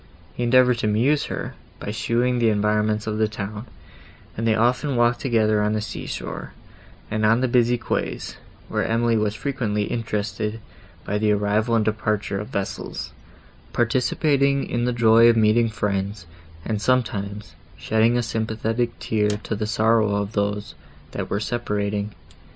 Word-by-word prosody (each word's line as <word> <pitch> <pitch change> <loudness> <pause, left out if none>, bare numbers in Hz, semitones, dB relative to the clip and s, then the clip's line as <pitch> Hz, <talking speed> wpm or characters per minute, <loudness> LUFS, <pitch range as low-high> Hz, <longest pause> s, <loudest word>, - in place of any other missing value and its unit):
He - - -6
endeavoured 125 0 +4
to 105 - 0
amuse 125 +8 +2
her - - -5 0.3
by 105 - -4
showing 120 +3 0
the 115 -1 +4
environs 105 0 +1
of 110 0 -2
the 110 - +3
town, 105 +2 -6 0.7
and 115 +1 -2
they 110 - +3
often 125 +5 +1
walked 120 0 +3
together 110 -5 +2
on 105 +1 +1
the 110 - 0
sea 105 - -6
shore, - - -6 0.6
and 110 0 -1
on 115 +3 +4
the 130 - +2
busy 120 0 +3
quays, 120 - -3 0.3
where - - -1
Emily 115 +1 +1
was 105 -1 0
frequently 115 -7 -1
interested 105 -1 -3 0.5
by 105 +1 -1
the 105 0 +2
arrival 105 +3 +1
and 110 -2 +2
departure 105 -2 -1
of 105 - -5
vessels, 100 -1 -4 0.6
participating 140 +3 +1
in 120 0 -1
the 125 - +1
joy 115 0 +6
of 115 - +3
meeting 110 +1 +4
friends, 100 -2 -2 0.4
and, 105 -2 -2
sometimes, 105 -5 -1 0.2
shedding 115 +2 +2
a 120 - +1
sympathetic 115 +1 -2
tear 105 -1 0
to 105 +1 -3
the 105 +1 -2
sorrow 110 -1 +2
of 100 0 -2
those, 105 0 -2 0.4
that - - -4
were 100 - 0
separating. 105 -3 -2
110 Hz, 155 wpm, -23 LUFS, 105-120 Hz, 0.7 s, joy